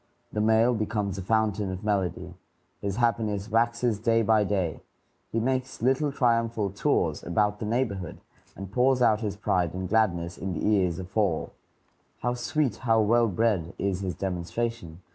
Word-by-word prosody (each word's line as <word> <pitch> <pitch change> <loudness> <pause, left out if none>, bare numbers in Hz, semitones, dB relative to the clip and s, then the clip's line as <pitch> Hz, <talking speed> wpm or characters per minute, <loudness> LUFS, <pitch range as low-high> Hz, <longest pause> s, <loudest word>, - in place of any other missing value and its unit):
The 105 - 0
male 110 +3 +4
becomes 105 -3 -2
a - - -4
fountain 105 -1 0
of 95 +1 -6
melody; 100 -5 -1 0.5
his 100 -1 -2
happiness 110 -3 0
waxes 115 -1 +1
day 115 +1 +2
by 110 -1 +4
day; 95 -6 -1 0.5
he 115 - 0
makes 130 +2 -1
little 135 +4 +1
triumphal 115 -6 +1
tours 95 - 0
about 105 +4 0
the 105 - -3
neighborhood, 105 -7 -2 0.4
and 95 -1 -8
pours 125 +2 +3
out 110 -2 +3
his 100 -2 -3
pride 90 -4 0
and 95 0 -3
gladness 90 -5 0
in 95 -1 -3
the - - -3
ears 95 -5 +2
of 90 -1 -9
all. 100 -7 +1 0.7
How 120 +1 0
sweet, 125 -1 -1
how 115 -3 +2
well 115 +2 +3
bred, 100 -4 0
is 95 -2 -1
his 95 -3 -3
demonstration! 90 0 -4
105 Hz, 160 wpm, -27 LUFS, 95-115 Hz, 0.7 s, male